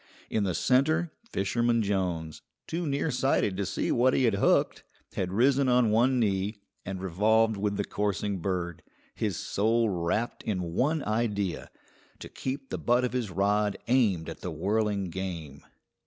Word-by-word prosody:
In 105 Hz, -2 st, +1 dB
the 90 Hz, -3 st, -1 dB
centre 155 Hz, +6 st, +2 dB, 0.2 s
Fisherman 115 Hz, +3 st, +1 dB
Jones, 90 Hz, -6 st, -2 dB, 0.2 s
too 170 Hz, 0 st, -3 dB
nearsighted 135 Hz, -7 st, +1 dB
to 100 Hz, 0 st, -2 dB
see -, -, -1 dB
what 130 Hz, +2 st, +3 dB
he -, -, +2 dB
had 115 Hz, -4 st, +3 dB
hooked, 100 Hz, -, +2 dB, 0.3 s
had 90 Hz, -1 st, -2 dB
risen 130 Hz, +5 st, +3 dB
on 125 Hz, -3 st, +4 dB
one 125 Hz, +4 st, +3 dB
knee, 100 Hz, -1 st, 0 dB, 0.2 s
and 95 Hz, 0 st, -5 dB
revolved 110 Hz, +5 st, +2 dB
with 100 Hz, 0 st, -1 dB
the 100 Hz, -, 0 dB
coursing 100 Hz, -1 st, -2 dB
bird, 85 Hz, -2 st, -3 dB, 0.3 s
his -, -, -2 dB
soul 115 Hz, +2 st, +1 dB
wrapped 95 Hz, +6 st, -1 dB
in 90 Hz, -5 st, -3 dB
one 150 Hz, -, +1 dB
idea: 105 Hz, -4 st, -1 dB, 0.5 s
to -, -, -9 dB
keep 135 Hz, +1 st, -5 dB
the -, -, -3 dB
butt 125 Hz, +1 st, +2 dB
of 125 Hz, -, -3 dB
his 125 Hz, -5 st, -1 dB
rod 100 Hz, +3 st, +1 dB
aimed 110 Hz, -10 st, +2 dB
at -, -, -7 dB
the 90 Hz, -, -4 dB
whirling 100 Hz, +3 st, -1 dB
game. 85 Hz, -7 st, -6 dB
105 Hz, 155 wpm, -28 LUFS, 95-120 Hz, 0.5 s, on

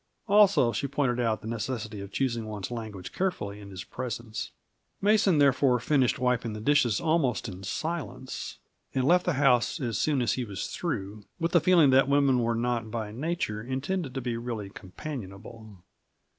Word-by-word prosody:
Also, 200 Hz, -, +5 dB
she 130 Hz, +5 st, -2 dB
pointed 135 Hz, -3 st, 0 dB
out 115 Hz, -3 st, 0 dB
the 110 Hz, -, -8 dB
necessity 110 Hz, -2 st, -4 dB
for 100 Hz, -, -6 dB
choosing 115 Hz, +1 st, -2 dB
one's 105 Hz, -2 st, -5 dB
language 110 Hz, -6 st, -6 dB
carefully 105 Hz, -, -2 dB
in 100 Hz, -1 st, -10 dB
his 95 Hz, -2 st, -7 dB
presence. 115 Hz, -3 st, -5 dB, 0.5 s
Mason, 200 Hz, -3 st, +4 dB
therefore, 135 Hz, -3 st, +4 dB
finished 130 Hz, 0 st, +2 dB
wiping 125 Hz, -3 st, 0 dB
the 105 Hz, -, -6 dB
dishes 120 Hz, -3 st, +3 dB
almost 155 Hz, -8 st, +1 dB
in 95 Hz, -2 st, -8 dB
silence, 145 Hz, -, -4 dB, 0.4 s
and 130 Hz, -, +2 dB
left 180 Hz, +6 st, +4 dB
the 180 Hz, -, +3 dB
house 135 Hz, +1 st, +3 dB
as 120 Hz, -7 st, -2 dB
soon 145 Hz, -5 st, +2 dB
as 120 Hz, -, +1 dB
he 130 Hz, -, -2 dB
was 100 Hz, -4 st, -5 dB
through, 105 Hz, -, -4 dB
with 165 Hz, +1 st, 0 dB
the 175 Hz, -4 st, +5 dB
feeling 170 Hz, -7 st, +5 dB
that 135 Hz, +1 st, +5 dB
women 140 Hz, -2 st, +4 dB
were 115 Hz, -1 st, +1 dB
not 115 Hz, -1 st, -1 dB
by 110 Hz, -1 st, -4 dB
nature 125 Hz, -4 st, -2 dB
intended 135 Hz, -, -3 dB
to 135 Hz, -, -2 dB
be 120 Hz, -2 st, -2 dB
really 115 Hz, -4 st, -5 dB
companionable. 100 Hz, -, -9 dB
125 Hz, 170 wpm, -28 LUFS, 110-145 Hz, 0.5 s, Also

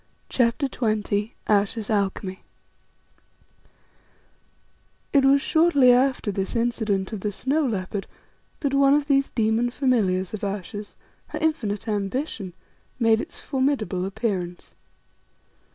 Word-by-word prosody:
CHAPTER 245 Hz, +3 st, +1 dB
XX 215 Hz, -3 st, -1 dB
AYESHA'S 210 Hz, +1 st, +1 dB
ALCHEMY 195 Hz, -2 st, -1 dB, 2.7 s
It 280 Hz, -2 st, +5 dB
was 275 Hz, +1 st, +5 dB
shortly 315 Hz, -6 st, +5 dB
after 255 Hz, -3 st, +2 dB
this 195 Hz, +2 st, -3 dB
incident 220 Hz, -4 st, 0 dB
of 215 Hz, -, -3 dB
the 205 Hz, +2 st, -2 dB
snow 280 Hz, +8 st, 0 dB
leopard 195 Hz, -2 st, -3 dB, 0.5 s
that 280 Hz, -3 st, 0 dB
one 275 Hz, 0 st, +5 dB
of 295 Hz, -1 st, +1 dB
these 275 Hz, -1 st, +2 dB
demon 225 Hz, +1 st, +1 dB
familiars 215 Hz, -9 st, +1 dB
of 215 Hz, -, -5 dB
Ayesha's, 205 Hz, +1 st, -5 dB, 0.3 s
her -, -, -6 dB
infinite 235 Hz, -10 st, -1 dB
ambition, 205 Hz, -, -3 dB, 0.4 s
made 225 Hz, -2 st, +3 dB
its -, -, -9 dB
formidable 260 Hz, -9 st, -1 dB
appearance. 190 Hz, -4 st, -3 dB
220 Hz, 110 wpm, -24 LUFS, 200-270 Hz, 2.7 s, It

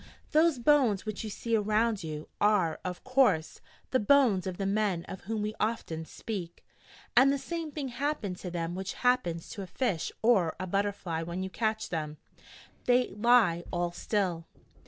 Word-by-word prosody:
Those 315 Hz, -1 st, +4 dB
bones 240 Hz, -6 st, +3 dB
which 215 Hz, 0 st, -4 dB
you 215 Hz, -, -4 dB
see 230 Hz, +3 st, -1 dB
around 215 Hz, 0 st, +1 dB
you, 155 Hz, -1 st, -6 dB
are, 205 Hz, -6 st, +3 dB
of 180 Hz, -1 st, -5 dB
course, 250 Hz, -12 st, +2 dB, 0.3 s
the 260 Hz, -, +3 dB
bones 215 Hz, -5 st, +4 dB
of 185 Hz, -1 st, -4 dB
the 195 Hz, -, -2 dB
men 195 Hz, -4 st, 0 dB
of 190 Hz, -, -8 dB
whom 215 Hz, +1 st, -2 dB
we 210 Hz, +1 st, -2 dB
often 190 Hz, -8 st, -2 dB
speak: 180 Hz, -2 st, -6 dB, 0.5 s
and 265 Hz, +3 st, +7 dB
the 280 Hz, -, +1 dB
same 320 Hz, +3 st, -5 dB
thing 285 Hz, -3 st, -4 dB
happened 245 Hz, -7 st, -2 dB
to 180 Hz, -, -6 dB
them 170 Hz, -1 st, -3 dB
which 190 Hz, +1 st, -4 dB
happens 175 Hz, -10 st, +2 dB
to 200 Hz, -, -6 dB
a 190 Hz, -, -6 dB
fish 195 Hz, -5 st, -1 dB
or 195 Hz, -9 st, +3 dB
a 185 Hz, -, -2 dB
butterfly 195 Hz, -3 st, -1 dB
when 170 Hz, +3 st, -4 dB
you 190 Hz, -, -5 dB
catch 220 Hz, 0 st, -1 dB
them, 155 Hz, -3 st, -3 dB, 0.2 s
and -, -, -25 dB, 0.4 s
they 250 Hz, 0 st, +4 dB
lie 210 Hz, -6 st, +3 dB
all 175 Hz, 0 st, -1 dB
still.' 180 Hz, -3 st, -1 dB
205 Hz, 180 wpm, -30 LUFS, 175-240 Hz, 0.5 s, and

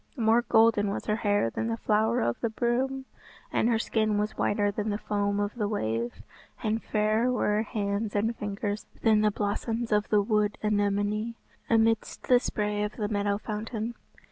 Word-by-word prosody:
More 225 Hz, 0 st, +4 dB
golden 225 Hz, -3 st, +4 dB
was 200 Hz, -, -4 dB
her 210 Hz, -, 0 dB
hair 205 Hz, -, +1 dB
than 225 Hz, -, -2 dB
the 230 Hz, 0 st, -1 dB
flower 220 Hz, +2 st, +1 dB
of 120 Hz, -, 0 dB
the 230 Hz, -, 0 dB
broom, 260 Hz, +4 st, -1 dB, 0.5 s
and 230 Hz, -, +2 dB
her 230 Hz, -, +3 dB
skin 215 Hz, -2 st, 0 dB
was 210 Hz, +1 st, -1 dB
whiter 205 Hz, 0 st, +1 dB
than 210 Hz, +1 st, -3 dB
the 205 Hz, -, -1 dB
foam 205 Hz, -1 st, -1 dB
of 205 Hz, 0 st, -1 dB
the 215 Hz, -4 st, -1 dB
wave, 115 Hz, -, -2 dB, 0.4 s
and 220 Hz, +1 st, 0 dB
fairer 215 Hz, +3 st, +1 dB
were 250 Hz, -, +1 dB
her -, -, +2 dB
hands 210 Hz, -1 st, -2 dB
and 210 Hz, +2 st, +2 dB
her -, -, -3 dB
fingers 205 Hz, -1 st, -4 dB, 0.2 s
than 220 Hz, -2 st, +5 dB
the 215 Hz, -, +4 dB
blossoms 225 Hz, +3 st, -2 dB
of 210 Hz, 0 st, +2 dB
the 210 Hz, -1 st, +4 dB
wood 210 Hz, 0 st, +1 dB
anemone 205 Hz, +2 st, 0 dB, 0.3 s
amidst 225 Hz, -1 st, +1 dB
the 250 Hz, -1 st, +7 dB
spray 210 Hz, -3 st, -2 dB
of 210 Hz, 0 st, -2 dB
the 210 Hz, -3 st, -2 dB
meadow 205 Hz, -1 st, 0 dB
fountain. 220 Hz, +2 st, -4 dB
210 Hz, 185 wpm, -28 LUFS, 205-225 Hz, 0.5 s, the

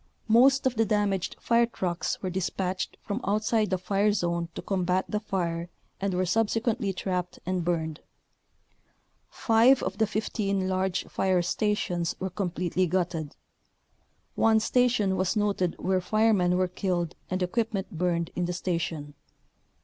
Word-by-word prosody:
Most 265 Hz, +5 st, +5 dB
of 260 Hz, -1 st, +1 dB
the 225 Hz, -, +4 dB
damaged 205 Hz, -3 st, 0 dB
fire 235 Hz, 0 st, +3 dB
trucks 180 Hz, -6 st, -2 dB
were 185 Hz, -, -2 dB
dis 185 Hz, 0 st, -1 dB
patched 185 Hz, 0 st, -3 dB
from 210 Hz, +4 st, -3 dB
outside 215 Hz, +1 st, +1 dB
the 185 Hz, -, +1 dB
fire 200 Hz, +3 st, +1 dB
zone 170 Hz, -4 st, -1 dB
to -, -, -4 dB
combat 185 Hz, -1 st, 0 dB
the 210 Hz, -, -1 dB
fire 170 Hz, -5 st, -2 dB, 0.3 s
and 195 Hz, -2 st, -1 dB
were 185 Hz, +1 st, +1 dB
subsequently 225 Hz, +1 st, +1 dB
trapped 180 Hz, -1 st, -3 dB
and 185 Hz, -1 st, -1 dB
burned. 160 Hz, -3 st, -1 dB, 1.3 s
Five 235 Hz, +4 st, +4 dB
of -, -, -3 dB
the 220 Hz, -, +3 dB
15 200 Hz, -2 st, -1 dB
large 185 Hz, 0 st, 0 dB
fire 185 Hz, -2 st, +1 dB
stations 180 Hz, -4 st, -1 dB
were 190 Hz, 0 st, -3 dB
completely 180 Hz, -1 st, -1 dB
gutted. 170 Hz, -4 st, -2 dB, 1.0 s
One 220 Hz, 0 st, +4 dB
station 220 Hz, -5 st, +2 dB
was 185 Hz, +4 st, 0 dB
noted 200 Hz, -4 st, 0 dB
where 185 Hz, 0 st, 0 dB
firemen 200 Hz, -3 st, +2 dB
were 185 Hz, 0 st, +2 dB
killed 175 Hz, -2 st, -2 dB, 0.2 s
and 185 Hz, 0 st, -1 dB
equipment 215 Hz, +1 st, -1 dB
burned 170 Hz, 0 st, 0 dB
in 180 Hz, -, 0 dB
the 180 Hz, -, -2 dB
station. 165 Hz, -5 st, -3 dB
190 Hz, 145 wpm, -27 LUFS, 180-210 Hz, 1.3 s, Most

